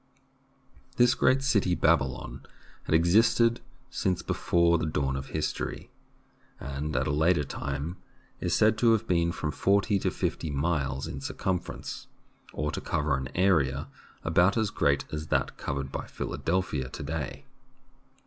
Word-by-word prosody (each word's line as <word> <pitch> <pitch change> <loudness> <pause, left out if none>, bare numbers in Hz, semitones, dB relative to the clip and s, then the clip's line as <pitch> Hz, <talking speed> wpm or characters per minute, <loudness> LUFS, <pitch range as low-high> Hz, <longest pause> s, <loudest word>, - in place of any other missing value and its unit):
This 120 0 +5
great 130 +1 +3
city, 100 -10 +2
Babylon, 65 -7 0 0.4
had - - +2
existed 115 +7 +4 0.3
since 95 -3 -1
be - - -1
fore 85 -1 +3
the 80 - -1
dawn 70 -3 -1
of 65 0 -5
history, - - -3 0.7
and 70 +2 -4
at 65 +2 +1
a 75 - 0
later 80 +2 +3
time 70 +5 -4 0.4
is - - 0
said 110 0 +3
to 115 -2 +5
have 110 - 0
been 85 -1 +2
from 75 -3 -3
forty 100 +4 +2
to - - 0
fifty 80 - -2
miles 70 -2 -1
in 70 - -6
circumference, 90 +5 -4 0.4
or 75 -1 -2
to - - -4
cover 75 -1 0
an 65 0 -4
area 75 -7 +2 0.3
about 85 +6 +3
as 110 -3 +1
great 70 -1 +1
as 75 0 -4
that 70 -4 0
covered 70 0 -4
by - - -5
Philadelphia 80 -7 -2
to - - -7
day. 75 -1 -5
80 Hz, 150 wpm, -28 LUFS, 70-95 Hz, 0.7 s, This